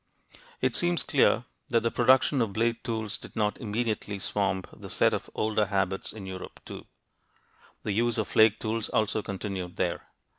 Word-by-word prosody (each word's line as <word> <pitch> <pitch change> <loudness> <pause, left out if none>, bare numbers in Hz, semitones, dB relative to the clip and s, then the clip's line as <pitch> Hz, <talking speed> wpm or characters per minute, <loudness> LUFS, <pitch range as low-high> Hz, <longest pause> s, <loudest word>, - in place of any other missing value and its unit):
It - - +1
seems 175 -1 +1
clear 125 -4 +3 0.2
that 115 -2 +3
the 115 +1 0
production 130 +1 +4
of 110 -4 0
blade 115 +2 0
tools 110 -2 -2
did - - -12
not 105 -1 0
immediately 110 -2 -2
swamp 95 -1 -1
the - - -10
set - - +3
of - - -3
older 110 -1 +1
habits 95 -1 -1
in 105 -3 -8
Europe, 95 -1 -8
too; - - -9 1.0
the 105 - -1
use 115 +3 +1
of 110 -3 0
flake 110 +1 +5
tools 110 0 -2
also 110 0 +1
continued 95 -3 -5
there. - - -2
110 Hz, 170 wpm, -28 LUFS, 100-115 Hz, 1.0 s, flake